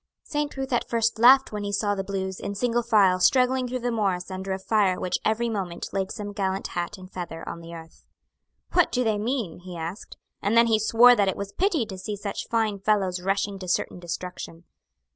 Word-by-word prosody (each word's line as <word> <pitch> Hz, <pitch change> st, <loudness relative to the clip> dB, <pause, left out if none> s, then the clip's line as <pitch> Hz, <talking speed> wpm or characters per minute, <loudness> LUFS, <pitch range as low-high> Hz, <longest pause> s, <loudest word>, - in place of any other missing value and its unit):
Saint 295 Hz, -1 st, -3 dB
Ruth 265 Hz, -1 st, -3 dB
at 240 Hz, -, 0 dB
first 230 Hz, -1 st, 0 dB
laughed 265 Hz, +3 st, +7 dB
when 210 Hz, -1 st, -4 dB
he 200 Hz, -, -3 dB
saw 205 Hz, 0 st, +1 dB
the 195 Hz, -1 st, -3 dB
Blues, 190 Hz, -1 st, -4 dB
in 200 Hz, -, -5 dB
single 240 Hz, +2 st, +1 dB
file, 205 Hz, -6 st, +4 dB
struggling 255 Hz, +5 st, +3 dB
through 255 Hz, +1 st, -3 dB
the 245 Hz, 0 st, -1 dB
morass 195 Hz, -5 st, -1 dB
under 190 Hz, +1 st, -5 dB
a 190 Hz, -, 0 dB
fire 195 Hz, -1 st, +1 dB
which 180 Hz, -, -1 dB
every 225 Hz, +2 st, +1 dB
moment 190 Hz, -6 st, -4 dB
laid 195 Hz, -1 st, -1 dB
some 205 Hz, -2 st, -6 dB
gallant 195 Hz, -1 st, -2 dB
hat 175 Hz, +3 st, -4 dB
and 185 Hz, 0 st, -12 dB
feather 170 Hz, -2 st, -6 dB
on 170 Hz, -, -6 dB
the 170 Hz, 0 st, -9 dB
earth. 165 Hz, 0 st, -13 dB, 0.7 s
"What 355 Hz, -2 st, +4 dB
do 250 Hz, -, +1 dB
they 215 Hz, -3 st, +1 dB
mean?" 230 Hz, -5 st, -2 dB
he 180 Hz, -1 st, -9 dB
asked; 165 Hz, +5 st, -7 dB, 0.2 s
and 210 Hz, +3 st, +1 dB
then 235 Hz, -, +7 dB
he 225 Hz, -2 st, +3 dB
swore 230 Hz, +3 st, +6 dB
that 205 Hz, -3 st, +2 dB
it 190 Hz, -, -1 dB
was 200 Hz, 0 st, -5 dB
pity 350 Hz, -, +1 dB
to 190 Hz, -3 st, -8 dB
see 210 Hz, +2 st, -4 dB
such 200 Hz, 0 st, -5 dB
fine 220 Hz, -3 st, 0 dB
fellows 195 Hz, -3 st, +1 dB
rushing 195 Hz, +1 st, -1 dB
to 185 Hz, -, -7 dB
certain 180 Hz, 0 st, -1 dB
destruction. 175 Hz, -1 st, -6 dB
200 Hz, 220 wpm, -25 LUFS, 185-230 Hz, 0.7 s, laughed